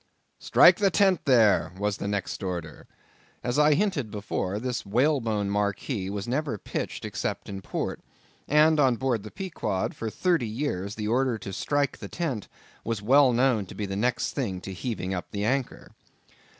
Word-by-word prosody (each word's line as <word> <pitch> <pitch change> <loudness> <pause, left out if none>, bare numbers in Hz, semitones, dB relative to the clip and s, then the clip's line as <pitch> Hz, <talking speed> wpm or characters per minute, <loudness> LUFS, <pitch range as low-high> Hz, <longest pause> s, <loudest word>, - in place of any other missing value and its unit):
"Strike - - +6
the 205 -3 +3
tent 190 -3 +2
there!"—was 105 - +3
the 100 - -4
next 100 0 -3
order. 85 -5 -5 0.6
As 125 +4 0
I 150 0 +5
hinted 175 - 0
before, 100 -2 -3
this 125 +2 -3
whalebone 115 -3 +1
marquee 100 0 -1
was 100 +1 -4
never 140 -1 -1
pitched - - -5
except - - -3
in 95 -1 -6
port; - - -3 0.5
and 155 +1 +5
on 130 -4 +4
board 125 -3 0
the 105 - -9
Pequod, 110 - -3
for 115 - -4
thirty 170 - +1
years, 105 -5 -3
the 105 -1 -3
order 125 +1 +1
to 95 -2 -7
strike 145 +6 -1
the - - -7
tent 140 - -3 0.4
was 115 -3 -3
well 135 +3 +6
known 120 -5 +2
to - - -10
be 105 - -3
the 95 0 -4
next 120 +3 0
thing 100 -9 -2
to 95 - -6
heaving 95 -2 -3
up 90 - -4
the 100 0 -3
anchor. 130 +2 -2
115 Hz, 170 wpm, -27 LUFS, 100-140 Hz, 0.6 s, Strike